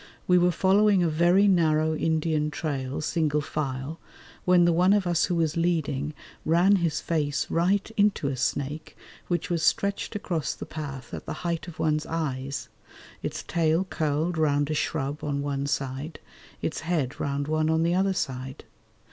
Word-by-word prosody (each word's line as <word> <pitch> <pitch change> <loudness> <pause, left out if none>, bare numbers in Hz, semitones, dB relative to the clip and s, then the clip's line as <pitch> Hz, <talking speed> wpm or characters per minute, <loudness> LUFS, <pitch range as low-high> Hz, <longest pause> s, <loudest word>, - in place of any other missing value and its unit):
We 180 0 +5
were 175 +1 +4
following 195 +2 +4
a - - +2
very 175 +6 +4
narrow 160 -4 +3
Indian 155 -1 0
trail 140 -4 -3
single 150 -1 +1
file, 140 +1 -4 0.5
when 180 -1 +5
the 170 - +4
one 180 +4 +4
of 205 -2 +2
us 175 -1 +2
who 175 - -1
was 160 -2 +1
leading 155 -4 0 0.3
ran 175 +5 +4
his 170 -4 0
face 150 -4 0
right 190 +4 +2
into 205 -8 +2
a 140 - -1
snake 140 +4 -3 0.3
which 175 0 -1
was 170 -2 0
stretched 200 +5 0
across 170 -7 -2
the - - -7
path 135 -5 -7
at - - -7
the - - -3
height 170 0 -2
of 170 - -9
one's 155 -1 0
eyes, 140 -4 -3 0.5
its - - -4
tail 165 +1 +1
curled 160 -1 -1
round 145 -1 +2
a - - +1
shrub 145 -1 -2
on 140 -1 -1
one 140 -1 -2
side, 135 +3 -3 0.4
its 160 - -2
head 155 -5 -2
round 140 0 -2
one 155 0 +1
on 160 0 +2
the 170 +1 +2
other 190 +1 +2
side. 130 -4 -4
160 Hz, 170 wpm, -26 LUFS, 145-175 Hz, 0.5 s, We